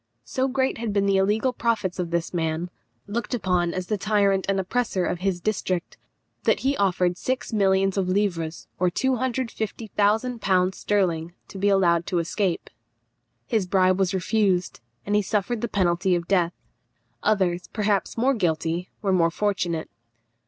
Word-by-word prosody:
So 260 +1 0
great 260 -2 0
had 225 -3 -2
been 200 -1 +2
the 195 -1 +3
illegal 210 +6 +2
profits 210 -7 -1
of 175 -2 -1
this 170 +1 -2
man, 165 +1 -1 0.3
looked 235 +4 -3
upon 180 -6 +1
as 185 0 -3
the 210 +2 -2
tyrant 200 -2 +2
and 195 0 +2
oppressor 190 -1 0
of 175 - -2
his 185 -1 -1
district, 185 -3 -2 0.5
that - - +2
he 275 +1 +1
offered 180 -3 +1
six 255 -2 -2
millions 195 -1 +2
of 185 -2 0
livres, 175 -5 -1
or 180 0 +3
250,000l. 220 -4 0
sterling, 175 -6 0 0.2
to 195 - -8
be 200 +1 +3
allowed 175 -4 +3
to 180 - 0
escape. 170 +2 -1 0.7
His 220 -6 0
bribe 185 0 +3
was 190 -1 +1
refused, 190 -1 +1 0.3
and 205 - 0
he 210 - +4
suffered 210 +3 -1
the 235 - 0
penalty 180 -3 +1
of 170 -1 -3
death. 180 -3 +2 0.7
Others, 180 -4 +1
perhaps 210 -1 -1
more 260 +4 +3
guilty, 170 -3 -1
were 195 -2 +2
more 170 -2 +4
fortunate. 175 -3 -1
195 Hz, 155 wpm, -25 LUFS, 180-215 Hz, 0.7 s, he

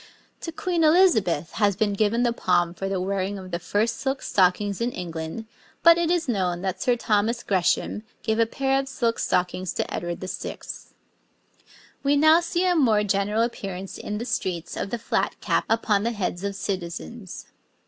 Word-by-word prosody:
To 330 - -5
Queen 340 0 -1
Elizabeth 225 - +4
has 205 -3 +2
been 205 0 +1
given 215 +4 +1
the 240 -1 +2
palm 175 -5 +1
for 195 +2 -4
the 195 -1 -1
wearing 195 +1 -2
of 185 -1 -9
the 170 - -2
first 205 +6 0
silk 270 0 -2
stockings 195 +2 +2
in 240 +1 0
England, 165 +4 -5 0.4
but 335 0 +8
it 340 -1 +1
is 345 -3 +1
known 185 -6 -1
that 190 -2 -2
Sir 250 -2 +3
Thomas 230 +1 0
Gresham 190 +2 +1 0.2
gave 220 0 0
a 230 - +4
pair 270 +3 +1
of 275 - -3
silk 235 -4 -1
stockings 180 0 0
to - - -3
Edward 175 0 -3
VI. 185 - -5 1.4
We 285 +1 +2
now 315 +3 +6
see 345 +1 -1
a 360 -1 +3
more 225 -9 +4
general 205 +2 +1
appearance 195 -5 -5
in 210 - -4
the 235 - -4
streets 185 -8 -3
of - - -3
the 240 - -2
flat 230 - -1
cap - - 0
upon 220 -2 +2
the 235 +3 -1
heads 185 -3 -3
of 200 0 -2
citizens. 190 +2 -5
210 Hz, 180 wpm, -25 LUFS, 185-245 Hz, 1.4 s, but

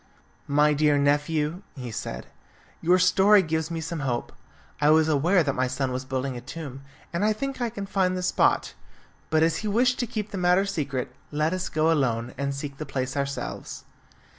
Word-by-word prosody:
"My 150 +1 +4
dear 150 0 +3
nephew," 150 +4 +1
he 125 -4 -6
said, - - -5 0.6
"your 175 +2 +4
story 190 +2 +5
gives 160 -1 -1
me 165 -1 -3
some 165 0 -4
hope. 125 -4 -2 0.5
I 150 - +5
was 155 0 +5
aware 165 +5 +3
that 140 -2 0
my 130 0 0
son 130 +1 -2
was 130 +1 -3
building 130 0 -2
a 120 - -6
tomb, 135 0 -8 0.3
and 170 - 0
I 215 +1 +3
think 270 +3 -4
I 240 - +1
can 200 -3 -6
find 185 -2 +1
the 180 - -3
spot. 180 - +2 0.6
But 160 0 +3
as 165 0 +2
he 215 - -4
wished 245 +4 +2
to 245 - 0
keep 210 -1 -4
the 195 - -4
matter 180 +2 +3
secret, 140 -10 -3 0.2
let 155 +3 0
us 185 -1 -2
go 155 +1 +2
alone 125 -6 0
and 140 +1 -2
seek 140 0 -6
the 155 - -5
place 130 -1 -3
ourselves." 140 -1 -4
155 Hz, 195 wpm, -26 LUFS, 140-185 Hz, 0.6 s, story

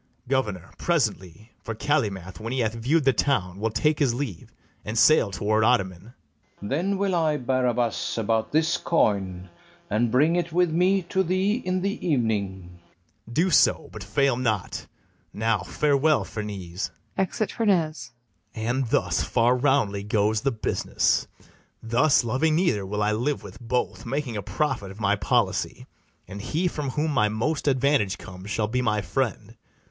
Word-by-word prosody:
BARABAS. - - -19
Governor, 105 -9 -1
presently; 110 - -1
For 115 - -5
Calymath, 105 - -1
when 115 +2 -5
he 130 0 0
hath 110 -1 0
view'd 135 +8 +1
the 135 0 +4
town, 100 -9 0
Will 110 +2 0
take 145 +8 +1
his 130 -5 +2
leave, 125 - -5 0.3
and 110 +2 -4
sail 115 -1 +5
toward 110 +3 0
Ottoman. 105 -2 0 0.4
FERNEZE. 100 - -7
Then 185 +8 0
will 195 -1 0
I, 160 -3 +2
Barabas, 125 -3 0
about 110 0 0
this 160 +3 +2
coin, 95 - 0 0.4
And 115 +3 +2
bring 150 +8 +3
it 175 -1 -1
with 175 0 +2
me 185 +3 +2
to 190 +2 0
thee 185 +3 +1
in 185 0 -1
the 200 +1 -2
evening. 100 - -1 0.5
BARABAS. 120 - -10
Do 170 +8 +2
so; - - +3
but 110 -3 -8
fail 120 +5 +1
not: 110 -7 -2 0.5
now 110 0 +1
farewell, 150 - +2
Ferneze: 100 -3 -5 0.3
[Exit 195 +3 -1
FERNEZE.] 175 - 0 0.5
And 120 +3 -1
thus - - +1
far 120 +2 +2
roundly 125 -7 +1
goes 105 +1 +1
the 135 - +1
business: 110 - 0 0.6
Thus, 125 +5 +3
loving 135 +7 +1
neither, 125 - +1
will 105 +1 -1
I 105 - +2
live 125 +7 -1
with 100 -1 -11
both, 120 0 -2
Making 135 -2 -2
a 105 - -2
profit 125 -6 -2
of 95 +3 -11
my 100 -1 +2
policy; 100 -3 0 0.4
And 100 +1 -7
he 165 - -1
from 150 -5 -3
whom 150 +4 -1
my 105 -6 +2
most 135 +9 -2
advantage 135 -7 +2
comes, 95 0 -10
Shall 105 0 0
be 125 +4 -1
my 105 -3 +1
friend. 115 -4 -2
120 Hz, 160 wpm, -25 LUFS, 105-150 Hz, 0.6 s, sail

